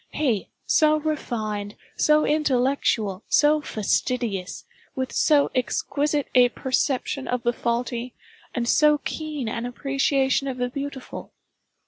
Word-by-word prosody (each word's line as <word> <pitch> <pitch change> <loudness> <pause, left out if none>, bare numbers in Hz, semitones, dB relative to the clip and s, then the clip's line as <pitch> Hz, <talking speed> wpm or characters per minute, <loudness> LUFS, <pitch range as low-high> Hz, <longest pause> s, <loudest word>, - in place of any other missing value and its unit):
He, 245 -10 -1 0.2
so 310 -1 +4
refined, 220 -9 -3 0.2
so 305 0 +3
intellectual, 255 -8 +1
so 300 +1 +4
fastidious, 215 -4 -2 0.3
with 260 -1 -3
so 295 -3 +3
exquisite 285 +3 -1
a 250 -1 +6
perception 265 +1 -1
of 250 -1 -2
the 240 0 +1
faulty, 240 +1 -2 0.4
and 235 -1 -1
so 300 +3 +5
keen 300 -3 -4
an 230 +2 -3
appreciation 275 +1 0
of 260 -2 -3
the 245 0 -1
beautiful! 280 0 -7
260 Hz, 115 wpm, -24 LUFS, 235-290 Hz, 0.4 s, a